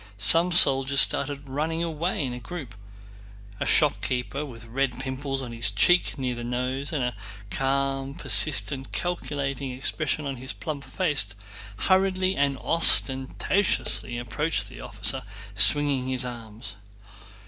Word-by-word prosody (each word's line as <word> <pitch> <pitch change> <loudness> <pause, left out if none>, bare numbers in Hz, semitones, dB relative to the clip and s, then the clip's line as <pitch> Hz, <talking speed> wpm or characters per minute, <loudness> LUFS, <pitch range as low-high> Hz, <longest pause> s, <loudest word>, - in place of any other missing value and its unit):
Some 165 - +5
soldiers 135 -4 +4
started 140 0 +5
running 155 +5 -3
away 165 -1 -3
in 125 - -5
a 125 - -8
group. 145 -5 -9 0.9
A - - -3
shopkeeper 135 -3 0
with 115 -6 -11
red 125 +2 -3
pimples 135 0 -5
on 120 - -8
his 115 -3 -1
cheeks 175 - +2
near 130 -2 -3
the 120 0 -8
nose, 125 +4 -4
and 150 -5 -3
a 125 -2 -4 0.4
calm, 135 0 -2
persistent, 140 -4 +1
calculating 140 -6 -4
expression 150 +3 -1
on 135 -2 -5
his 130 +3 -4
plump 145 -3 -7
face, 145 - -1 0.4
hurriedly 190 - 0
and 140 -1 -1
ostentatiously 135 -1 +4
approached 150 +7 -3
the - - -12
officer, - - -2 0.3
swinging 130 +6 +2
his 130 -1 -2
arms. 115 -3 -9
135 Hz, 130 wpm, -24 LUFS, 125-150 Hz, 0.9 s, Some